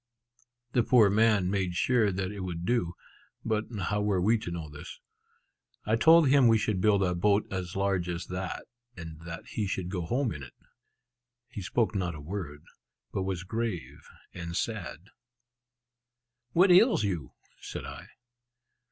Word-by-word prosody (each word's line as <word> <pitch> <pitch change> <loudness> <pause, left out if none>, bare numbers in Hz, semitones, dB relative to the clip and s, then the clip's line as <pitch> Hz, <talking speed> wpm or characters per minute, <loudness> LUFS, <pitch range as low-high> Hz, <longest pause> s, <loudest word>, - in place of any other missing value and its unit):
The 120 - +3
poor 115 -4 +5
man 105 -3 +3
made 95 -3 -1
sure 115 0 +2
that 95 0 -3
it 105 - -7
would 90 -2 -4
do. 105 -8 0 0.5
But 110 -1 0 0.2
how 105 +4 0
were 105 -2 +1
we 110 +5 +3
to 95 - -6
know 85 -2 -5
this? 75 0 -10 0.9
I 110 - +2
told 160 +6 +6
him 135 -2 +5
we 115 -1 +5
should 105 -3 -1
build 100 -2 +4
a 90 -1 +1
boat 100 +4 +2
as 90 -2 -4
large 95 -3 0
as 85 0 -3
that, 90 0 -5 0.3
and 80 -1 -9
that 85 - -7
he 105 -3 -2
should 95 -2 -3
go 90 -3 -3
home 125 0 0
in 75 - -8
it. 65 -3 -11 0.9
He 105 - -7
spoke 110 +4 0
not 90 -4 -2
a - - -8
word, 75 -2 -6 0.5
but 95 - -1
was 95 -1 -3
grave 110 -3 -4 0.3
and 85 0 -5
sad. 110 -2 -4 1.4
"What 180 +2 +5
ails 195 - +6
you?" 85 -10 -3 0.3
said - - -7
I. - - -9
95 Hz, 160 wpm, -29 LUFS, 90-110 Hz, 1.4 s, told